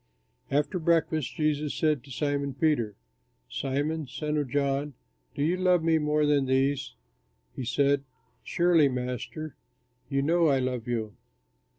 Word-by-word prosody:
After 145 +5 0
breakfast 160 -2 +1
Jesus 150 -1 0
said 150 -5 +1
to 140 - -16
Simon 140 +1 -1
Peter, 135 -9 +1 0.5
"Simon, 145 +3 -2
son 150 +3 -3
of 145 -3 -1
John, 140 +1 0 0.4
do 140 - -1
you 165 +4 +2
love 180 -2 +3
me 160 -1 +3
more 150 0 +2
than 145 -2 +2
these?" 135 +1 +1 0.6
He 130 - -4
said, 140 +3 +2 0.4
"Surely, 170 -5 +3
Master, 125 +4 -4 0.5
you 135 0 +1
know 165 +3 +3
I 140 -2 +4
love 125 -2 -2
you." 110 -3 -2
145 Hz, 135 wpm, -28 LUFS, 135-155 Hz, 0.6 s, I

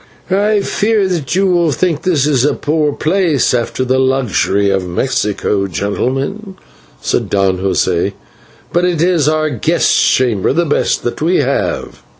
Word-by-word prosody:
"I 205 +2 +2
fear 210 0 0
that 170 -6 -2
you 195 +1 +2
will 175 -4 +2
think 165 0 -1
this 150 -7 +1
a 145 - +1
poor 150 0 0
place, 160 -4 +1
after 125 +1 -1
the 130 +1 +1
luxury 120 -7 +1
of 95 -2 -1
Mexico, 105 -1 -1
gentlemen," 135 - -3 0.4
said - - -1
Don 95 -2 +1
José, 95 0 0 0.6
"but 175 - +2
it 180 -3 0
is 165 -3 +2
our 155 -1 0
guest 120 - +1
chamber, 120 -4 +2
the 170 +3 +1
best 145 - 0
that 120 - -4
we 170 +4 +2
have." 140 -3 -1
145 Hz, 150 wpm, -15 LUFS, 120-175 Hz, 0.6 s, I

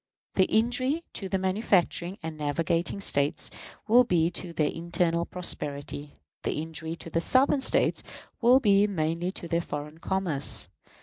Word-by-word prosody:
The 190 - +4
injury 255 - +1
to 195 - -5
the 195 - +1
manufacturing 185 -1 +1
and 160 -1 -5
navigating 165 +5 -1
States 150 -4 +2 0.4
will 240 +3 +7
be 170 -7 +2
to 180 0 -3
their 155 -3 0
internal 170 0 0
prosperity. 145 -4 -5 0.3
The - - -1
injury 160 +1 -5
to 165 - -11
the 165 - +1
Southern 265 - +3
States - - +2 0.4
will 245 +2 +6
be 205 -4 +4
mainly 170 -1 -1
to 170 - -6
their 170 +1 0
foreign 150 0 -6
commerce. 175 -6 +1
170 Hz, 145 wpm, -27 LUFS, 160-200 Hz, 0.4 s, will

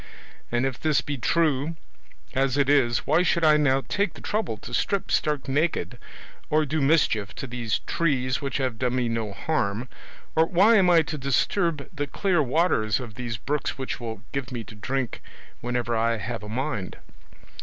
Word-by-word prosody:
And 120 +2 +1
if 135 -3 -2
this 155 -3 +2
be 145 - -4
true, 155 +2 +1 0.6
as 135 0 +1
it 140 -1 +2
is, 125 -5 +3
why 155 +4 +4
should 170 -2 +2
I 155 -1 +6
now 135 -2 +2
take 200 -3 0
the - - -11
trouble 210 - -2
to - - -10
strip 200 -2 0
stark 150 -3 0
naked, 150 +5 0 0.5
or 155 0 +3
do 155 +1 -1
mischief 135 -8 +2
to - - -5
these 120 -3 -2
trees 135 -5 0
which 140 -3 -2
have 130 -5 -2
done 125 -1 0
me 125 -2 +1
no 115 -2 -2
harm, 115 -1 -1 0.5
or 160 +1 +4
why 200 +7 +5
am 185 -3 +5
I 170 -2 +6
to 155 0 -5
disturb 150 +3 0
the 145 -1 -2
clear 180 +3 +1
waters 130 -6 +2
of 120 -4 -7
these 120 -1 -4
brooks 145 +11 -2
which 130 -1 -4
will 110 -3 -6
give 135 -3 -3
me 120 -2 -4
to 110 - -12
drink 125 +4 -3 0.4
whenever 120 -1 -1
I 115 +1 +1
have 115 +1 -4
a 105 - -8
mind? 110 -5 -3
135 Hz, 185 wpm, -25 LUFS, 120-155 Hz, 0.6 s, I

